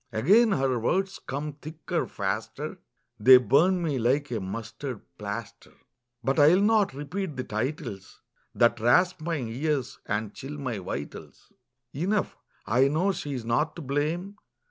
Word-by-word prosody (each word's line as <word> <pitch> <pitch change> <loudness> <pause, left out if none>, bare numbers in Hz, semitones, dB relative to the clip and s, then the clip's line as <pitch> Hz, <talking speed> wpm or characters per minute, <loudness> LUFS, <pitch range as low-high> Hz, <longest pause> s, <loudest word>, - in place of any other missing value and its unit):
Again 200 - +4
her 130 -4 +1
words 190 - 0
come 145 +3 -3
thicker, 155 +1 -4
faster, - - -4 0.4
They 130 +4 +9
burn 170 +8 +3
me 145 -5 -1
like 130 +4 +1
a 115 - -1
mustard 115 +5 -6 0.2
plaster. 105 +1 -7 0.5
But 135 +6 +1
I 145 - +7
will 190 - +3
not 210 -7 +3
repeat 150 +2 -4
the 130 - -2
titles 110 -4 -4 0.4
That 120 0 +3
rasp 175 +10 +3
my 165 +1 -2
ears 130 +2 -2
and 105 0 -2
chill 145 +3 -7
my 130 -7 -3
vitals. 75 -6 -7 0.4
Enough, 190 +8 -1 0.3
I 125 +6 +3
know 165 +8 +1
she's 140 -9 -5
not 120 +7 0
to 170 - -7
blame. 160 +9 -2
140 Hz, 145 wpm, -27 LUFS, 120-165 Hz, 0.5 s, They